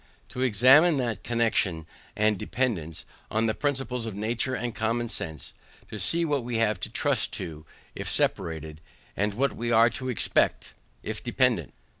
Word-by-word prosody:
To 125 - -5
examine 130 - +6
that 120 -6 -2
connexion 110 -8 +1 0.3
and 105 0 +3
dependance, 95 -8 -2 0.2
on 110 +1 +1
the 110 - +1
principles 135 -4 -2
of 110 - -5
nature 115 +5 -1
and 120 -2 -3
common 115 +2 -1
sense, 80 -9 -6 0.4
to 110 - -5
see 170 +8 +2
what 145 -5 0
we 120 0 -4
have 110 -4 +1
to - - -5
trust - - 0
to, 75 -1 -6 0.3
if - - -5
separated, 80 -1 -1 0.3
and 105 +1 0
what 135 +4 0
we 120 +1 -2
are 115 0 +5
to 130 +3 -5
expect, 120 - +1 0.3
if 110 0 -5
dependant. 120 - +1
115 Hz, 160 wpm, -27 LUFS, 100-125 Hz, 0.4 s, examine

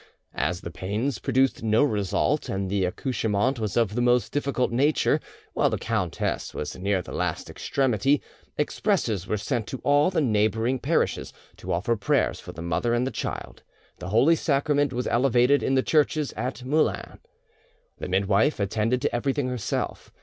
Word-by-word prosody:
As 90 0 -1
the 85 - -7
pains 105 - -2
produced 135 0 +1
no 110 +3 +3
result, 105 -9 0
and 95 -1 -2
the 100 -2 +1
accouchement 115 +4 -1
was 105 -1 -2
of 115 -4 +2
the 120 - 0
most 120 0 +2
difficult 140 -4 0
nature, 140 +6 +2 0.3
while - - +2
the - - -1
countess - - -2
was 75 - -4
near 95 0 -1
the - - -10
last - - -2
extremity, 135 +1 +1 0.4
expresses 145 - 0
were 105 - 0
sent 110 +2 -2
to 130 - -5
all 145 +3 +4
the 185 -3 0
neighbouring 110 0 +1
parishes - - 0 0.2
to - - -6
offer 95 +8 +1
prayers 100 - +1
for - - -9
the 85 - -8
mother 85 +8 0
and 120 +1 +1
the 135 - -2
child; - - -5 0.4
the 90 - -6
Holy 130 +11 +4
Sacrament 145 -2 +1
was 125 0 -2
elevated 125 +2 +3
in 135 - +1
the 130 - +3
churches 150 -1 +1
at 125 -1 -4
Moulins. 155 +4 0 0.8
The - - -5
midwife 100 +8 +2
attended 110 +5 0
to - - 0
everything 135 +1 0
herself. 120 -4 -3
120 Hz, 165 wpm, -25 LUFS, 105-135 Hz, 0.8 s, all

